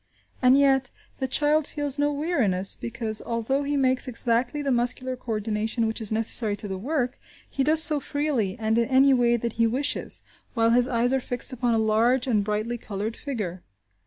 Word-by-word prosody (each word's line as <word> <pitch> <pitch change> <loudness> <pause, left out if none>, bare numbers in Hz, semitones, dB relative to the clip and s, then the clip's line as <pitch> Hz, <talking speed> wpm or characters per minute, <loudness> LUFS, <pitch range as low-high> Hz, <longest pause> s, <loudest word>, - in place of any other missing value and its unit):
And 255 +1 +5
yet, 270 -2 +3 0.3
the 265 - -1
child 295 +3 +2
feels 290 -1 -3
no 290 0 +2
weariness, 255 - 0
because, 225 -2 -3
although 235 +4 -2
he 285 0 -2
makes 260 -1 +1
exactly 245 +3 -1
the 275 - -1
muscular 250 +1 0
co 245 -2 -6
ordination 215 +2 -2
which 220 +1 -3
is 220 - -1
necessary 220 -1 +2
to 205 - -4
the 190 -1 -5
work, 255 +1 -2 0.3
he 275 - -2
does 315 +3 +7
so 300 -1 +5
freely 275 -9 -2
and 220 0 0
in 235 - 0
any 270 +1 +5
way 240 -2 +2
that 235 -1 -4
he 230 - +4
wishes, 265 +5 -2 0.3
while 230 -1 +2
his 245 +1 +3
eyes 245 +1 +1
are 265 - +2
fixed 245 +1 -1
upon 240 -2 0
a - - +1
large 225 +4 +2
and 220 -6 +1
brightly 215 +3 -3
coloured 215 +1 -5
figure. 205 - -5
245 Hz, 190 wpm, -25 LUFS, 220-270 Hz, 0.3 s, does